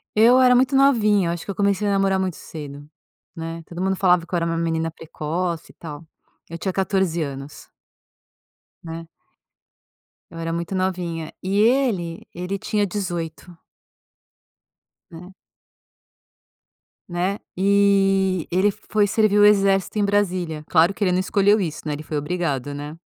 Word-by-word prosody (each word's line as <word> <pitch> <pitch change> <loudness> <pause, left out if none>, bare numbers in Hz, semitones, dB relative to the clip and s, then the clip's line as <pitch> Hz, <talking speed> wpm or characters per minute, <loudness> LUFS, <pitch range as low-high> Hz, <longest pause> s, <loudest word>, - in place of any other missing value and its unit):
Eu 240 +4 +6
era 250 -1 +6
muito 260 +2 +3
novinha, 215 -9 +4
eu - - +1
acho 170 -1 -5
que - - -4
eu 195 - -7
comecei 200 0 +1
a - - +1
namorar 195 -1 +2
muito 185 -3 -2
cedo, 145 -2 -9 0.5
né, 165 -1 -6
todo 175 +2 -7
mundo 190 0 +1
falava 180 -3 +3
que - - -16
eu - - +2
era 170 -1 0
uma 165 0 -1
menina 165 -1 -1
precoce 165 +2 -4
e - - -27
tal. 155 -1 -9 0.4
Eu 170 - -6
tinha 185 +2 -3
14 190 -3 0
anos. 140 0 -8 1.1
Né. 165 0 -7 1.2
Eu 165 - -9
era 165 0 -3
muito 170 +3 -4
novinha 175 -4 -2
e 195 +2 0
ele, 215 -8 +1
ele 180 +3 -4
tinha 205 +1 -1
18. 175 -3 -5 1.6
Né. 180 +3 -11 1.8
Né, 180 +4 -1 0.2
e 195 -2 +3
ele 190 +4 +3 0.2
foi 210 -1 +3
servir 210 0 +2
o 205 - +7
exército 195 0 +3
em 205 - +2
Brasília, 180 -6 -1
claro 170 +3 +4
que 205 - -3
ele 185 - +2
não 180 - +1
escolheu 205 +2 +3
isso, 160 -5 -3
né, 150 - -2
ele 150 +1 -6
foi 155 0 -4
obrigado, 145 -3 -2
né. 145 +2 -7
180 Hz, 155 wpm, -22 LUFS, 165-200 Hz, 1.8 s, o